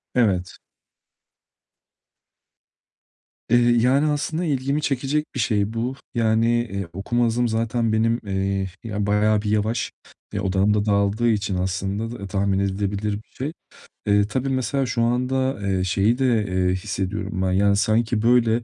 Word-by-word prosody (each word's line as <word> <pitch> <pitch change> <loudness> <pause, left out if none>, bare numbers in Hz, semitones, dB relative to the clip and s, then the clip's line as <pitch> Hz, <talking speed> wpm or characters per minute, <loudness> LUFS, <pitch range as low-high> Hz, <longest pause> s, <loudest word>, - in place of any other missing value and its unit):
Evet. 95 -7 +1 2.9
Eee, 120 - +5
yani 125 +5 +3
aslında 160 +4 -2
ilgimi 140 0 0
çekecek 140 +2 0
bir - - -2
şey 105 -1 +1
bu. 120 +3 -2 0.2
Yani, 115 0 +2 0.2
eee, 100 -3 -3
okuma 120 +6 0
hızım 120 +1 +1
zaten 115 0 0
benim, 115 +2 +2
eee, 95 0 -1 0.2
ya, 105 -2 -2
bayağı 105 +1 +2
bir 105 - -3
yavaş 110 +2 0 0.4
ve 100 - -2
odağım 95 +2 +2
da 105 0 +1
dağıldığı 100 +3 +2
için 100 -3 0
aslında 95 +5 -3
da 100 - -6
tahmin 95 0 0
edilebilir 100 +1 -1
bir 105 +2 -8
şey. 145 +5 -5 0.5
E, 100 0 +3
tabii 130 +5 -2
mesela, 135 +1 0
şu 115 0 -1
anda, 125 +1 0
eee, 95 -1 +1
şeyi 100 +6 +2
de, 135 - +1 0.2
eee, 90 -1 +1
hissediyorum 95 0 -3
ben, 95 -1 +1
yani 100 +2 +3
sanki, 110 +2 +1
böyle, 120 -1 +3
110 Hz, 145 wpm, -23 LUFS, 100-120 Hz, 2.9 s, Eee